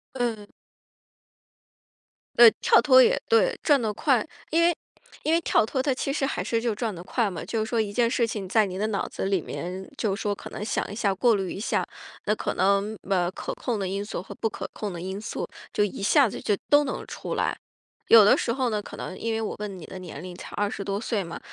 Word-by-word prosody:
嗯。 225 -5 -2 1.9
呃， 235 -1 +10
跳 - - +6
脱 260 -3 +7
也 - - +3
对， 475 +1 +3
转 290 -4 +4
得 215 -2 -1
快。 255 +1 +1 0.2
因 330 +2 +3
为 345 0 +4 0.5
因 310 - +1
为 335 - +4
跳 325 - +3
脱 260 +4 -1
它 275 0 +1
其 275 +1 -2
实 280 - -1
还 270 - -2
是 230 - 0
就 230 -2 -1
转 220 -1 -3
得 170 - -8
快 215 +2 0
嘛， 170 - -6
就 220 -2 -1
是 220 - -7
说 230 -1 +1
一 205 -2 -2
件 235 +1 +2
事 235 -1 +2
情 205 -4 -5
在 220 +2 +4
你 185 -1 -6
的 215 - 0
脑 205 -2 -1
子 - - -5
里 195 -1 +1
面， 185 +4 -6
就 210 -7 0
说 205 0 -2
可 - - -10
能 210 - -5
想 - - -2
一 - - -5
下， 205 -3 +1
过 235 +4 +3
滤 190 -3 -2
一 - - -6
下， 215 - 0 0.4
那 210 - +3
可 - - -3
能， 200 +2 +1
呃， 180 -3 +2
可 - - -5
控 235 -3 -2
的 195 -2 -2
因 195 +2 -3
素 210 - -5
和 - - -10
不 225 - -1
可 - - -6
控 205 -3 -5
的 170 - -6
因 190 +3 -5
素， 215 - -4 0.3
就 - - +1
一 200 -1 -5
下 270 +5 +5
子 - - -7
就 205 - +1
都 290 0 +5
能 270 - -4
出 - - -5
来。 - - 0 0.5
有 225 -3 +9
的 210 - +6
时 230 - -1
候 260 -2 0
呢， 210 -1 -1
可 - - -10
能 185 - -6
因 230 0 -2
为 220 - -1
我 215 - -3
问 205 -2 -5
你 165 - -10
的 190 - -8
年 170 -5 -8
龄 180 0 -8
才 - - -10
20 205 0 -1
多 200 0 -2
岁 225 -3 -1
嘛， 170 - -7
215 Hz, 260 characters per minute, -26 LUFS, 195-240 Hz, 1.9 s, 呃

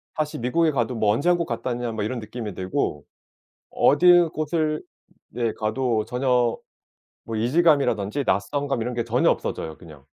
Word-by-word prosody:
다시 155 -1 -2
미국에 155 +7 +1
가도 125 -2 -1
뭐 110 -2 +2
'언제 140 +10 +1
한국 175 -1 +2
갔다 120 -2 -4
왔냐?' 120 -1 -3
뭐 110 -2 -3
이런 120 +4 -3
느낌이 110 -1 -6
들고 95 -5 -2 0.7
어드 175 +3 +5
곳을 155 0 -1 0.5
네 115 -1 -1
가도 110 0 -1
전혀 125 -1 +1 0.7
뭐 115 - -6
이질감이라든지 140 - +2
낯선감 135 +6 0
이런 125 +2 -3
게 120 -1 -1
전혀 120 +2 +2
없어져요 80 -1 -3
그냥. 75 -5 -14
120 Hz, 325 characters per minute, -24 LUFS, 110-145 Hz, 0.7 s, 어드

